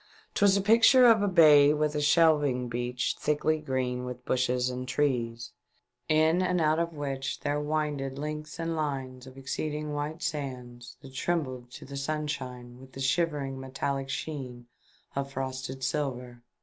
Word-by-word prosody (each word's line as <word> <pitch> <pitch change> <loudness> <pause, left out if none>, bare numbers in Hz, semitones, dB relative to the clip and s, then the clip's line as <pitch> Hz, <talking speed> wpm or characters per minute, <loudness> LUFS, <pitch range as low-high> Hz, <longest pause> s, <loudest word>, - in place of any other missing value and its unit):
'Twas 200 -1 +4
a - - +1
picture 230 +5 +6
of 225 -3 +6
a 205 - +2
bay 150 -6 +7
with 150 0 0
a 150 - -1
shelving 145 -5 +3
beach 120 +1 -2
thickly 155 +1 +1
green 130 -3 -2
with 125 0 -7
bushes 125 0 +1
and 125 0 -4
trees, 120 -4 -1 0.6
in 160 +3 +3
and 180 -1 +1
out 155 0 +2
of 170 0 -1
which 140 -2 -4
there 145 0 -1
winded 150 -3 -2
lengths 150 +1 -5
and 165 0 -2
lines 135 -4 -4
of 130 0 -13
exceeding 150 +3 -4
white 150 +3 -4
sand 130 -6 -5 0.2
that 135 -1 -12
trembled 130 -6 -2
to - - -11
the 140 +1 -7
sunshine 135 -4 -4
with 130 0 -15
the - - -9
shivering 135 -1 0
metallic 135 +1 -3
sheen 135 -5 -5 0.5
of 140 0 -3
frosted 130 0 -5
silver. 125 -4 -3
140 Hz, 155 wpm, -28 LUFS, 130-155 Hz, 0.6 s, bay